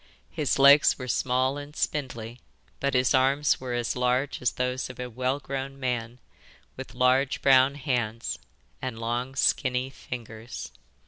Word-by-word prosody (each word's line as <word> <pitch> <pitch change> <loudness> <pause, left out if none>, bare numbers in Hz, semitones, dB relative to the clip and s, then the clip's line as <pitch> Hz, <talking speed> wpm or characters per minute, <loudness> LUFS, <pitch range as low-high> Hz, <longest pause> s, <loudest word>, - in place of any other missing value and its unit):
His 145 -2 0
legs 140 +2 +7
were 130 - -6
small 130 +3 0
and 145 +1 -10
spindly, 125 -6 -3 0.4
but 140 -1 0
his 125 -1 +3
arms 135 +3 +3
were 125 -2 -3
as 120 -1 -1
large 125 +3 0
as 125 - +1
those 125 +1 -2
of 130 - -10
a 125 -1 -5
well 130 +4 -1
grown 135 0 -5
man, 120 -2 -3 0.6
with 130 -1 -9
large 130 +2 +2
brown 135 0 +5
hands, 120 -6 -2 0.4
and 130 -3 -4
long 120 +3 -3
skinny 130 -1 +1
fingers. 115 -3 -8
130 Hz, 145 wpm, -27 LUFS, 125-135 Hz, 0.6 s, legs